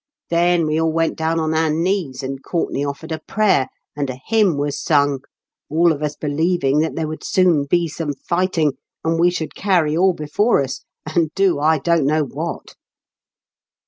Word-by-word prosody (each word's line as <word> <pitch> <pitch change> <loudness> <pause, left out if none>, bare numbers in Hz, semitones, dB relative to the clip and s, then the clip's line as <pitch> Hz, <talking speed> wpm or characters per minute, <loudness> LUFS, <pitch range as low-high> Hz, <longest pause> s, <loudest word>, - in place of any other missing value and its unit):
Then 170 0 +3
we 155 +1 0
all 160 0 +1
went 165 0 0
down 160 +1 0
on 160 0 0
our 160 0 +2
knees, 160 -4 -1
and 135 0 -5
Courtenay 165 -5 -2
offered 145 +3 -5
a 160 - -2
prayer, 195 -11 +1 0.3
and 145 -2 -2
a 130 - -5
hjrmn 210 -8 +3
was 145 0 -2
sung, 145 -3 +2 0.5
all 170 +3 +3
of 150 -2 -3
us 150 -1 -2
believing 150 -1 +1
that 160 +1 0
there 160 -1 -2
would 155 0 -7
soon 175 -6 +3
be 170 +4 +1
some 155 -1 -4
fighting, 170 -3 0 0.3
and 165 0 0
we 175 +1 +5
should 170 -3 -4
carry 175 -6 +1
all 185 +2 +4
before 155 +4 +1
us, 135 - -6 0.2
and 160 0 0
do 195 -6 +2
I 155 +2 +3
don't 160 0 +1
know 155 +1 +2
what. 140 - -5
160 Hz, 180 wpm, -20 LUFS, 145-170 Hz, 0.5 s, we